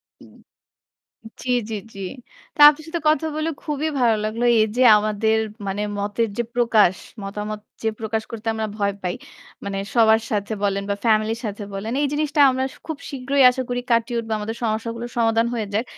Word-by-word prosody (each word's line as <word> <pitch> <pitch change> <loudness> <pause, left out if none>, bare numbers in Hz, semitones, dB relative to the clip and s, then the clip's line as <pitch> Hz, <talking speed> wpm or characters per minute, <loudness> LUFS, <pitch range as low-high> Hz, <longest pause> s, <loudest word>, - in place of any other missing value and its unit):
উ - - -22 1.2
জি, 255 - -6 0.2
জি, 220 - -3 0.2
জি। 195 - -10 0.6
তা - - 0
আপনার 300 +1 -4
সাথে 335 0 -3
কথা 310 0 +2
বলে 310 +1 -1
খুবই 300 0 -2
ভালো 235 -3 +4
লাগলো। 220 +3 -2 0.2
এই 215 - +5
যে 255 - +3 0.2
আমাদের 215 +1 +1 0.3
মানে 195 +2 -2 0.2
মতের 205 +3 -1
যে 240 - +1
প্রকাশ, 225 -6 +4 0.3
মতামত 210 +1 -5 0.2
যে 220 - +2
প্রকাশ 220 0 -2
করতে 230 0 -7
আমরা 220 0 -2
ভয় 200 -1 0
পাই। 180 -1 -2 0.5
মানে 200 -1 -4 0.2
সবার 220 -1 +5
সাথে 205 +1 -1
বলেন 200 0 0
বা 200 - +1
ফ্যামিলির 220 0 +2
সাথে 205 0 -5
বলেন। 200 +3 -4
এই 290 - +2
জিনিসটা 300 0 -1
আমরা 260 0 0 0.2
খুব 315 - -4
শীঘ্রই 275 0 +1
আশা 260 +1 -2
করি 245 0 -1
কাটিয়ে 235 +1 +2
উঠবো 225 -1 -4
আমাদের 215 +2 -4
সমস্যাগুলোর 230 +2 -2
সমাধান 225 0 +3
হয়ে 220 -3 -2
যাক। 215 +3 +1
225 Hz, 180 wpm, -22 LUFS, 210-245 Hz, 1.2 s, এই